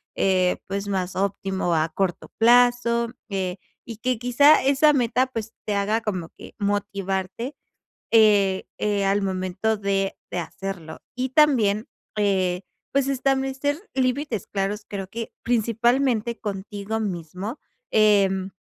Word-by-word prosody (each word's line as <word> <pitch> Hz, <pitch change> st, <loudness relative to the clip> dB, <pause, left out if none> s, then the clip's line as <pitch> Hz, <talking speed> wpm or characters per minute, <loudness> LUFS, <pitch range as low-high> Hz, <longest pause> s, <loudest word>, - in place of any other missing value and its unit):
eh, 185 Hz, -2 st, +2 dB
pues, 200 Hz, +1 st, -3 dB
más 190 Hz, -2 st, -2 dB
óptimo 190 Hz, -2 st, -1 dB
a 160 Hz, +1 st, +1 dB
corto 180 Hz, +1 st, -2 dB
plazo, 240 Hz, 0 st, +4 dB, 0.2 s
eh, 190 Hz, -2 st, -2 dB, 0.3 s
y 230 Hz, -3 st, -8 dB
que 250 Hz, +2 st, -1 dB
quizá 250 Hz, +6 st, +5 dB
esa 280 Hz, +3 st, +4 dB
meta, 255 Hz, -1 st, +2 dB
pues, 225 Hz, -4 st, -5 dB
te 210 Hz, -, -1 dB
haga 205 Hz, +3 st, +1 dB
como 185 Hz, -7 st, -3 dB
que -, -, -14 dB
motivarte, 200 Hz, +4 st, -2 dB, 0.6 s
eh, 205 Hz, -3 st, +4 dB
eh, 205 Hz, -1 st, 0 dB
al 200 Hz, +1 st, +2 dB
momento 190 Hz, +3 st, -1 dB
de 195 Hz, -1 st, -1 dB
de 180 Hz, -, -3 dB
hacerlo. 170 Hz, -1 st, -7 dB, 0.2 s
Y 255 Hz, +1 st, -1 dB
también, 245 Hz, -8 st, +3 dB, 0.3 s
eh, 190 Hz, -3 st, +1 dB, 0.3 s
pues 275 Hz, -1 st, +2 dB
establecer 270 Hz, +1 st, 0 dB, 0.2 s
límites 255 Hz, -, -1 dB
claros, 205 Hz, +1 st, -2 dB
creo 195 Hz, -2 st, -5 dB
que 230 Hz, +3 st, -6 dB
principalmente 235 Hz, +1 st, +1 dB
contigo 205 Hz, +1 st, -4 dB
mismo, 190 Hz, -, -4 dB, 0.3 s
em, 195 Hz, -3 st, +3 dB
205 Hz, 125 wpm, -24 LUFS, 195-245 Hz, 0.6 s, quizá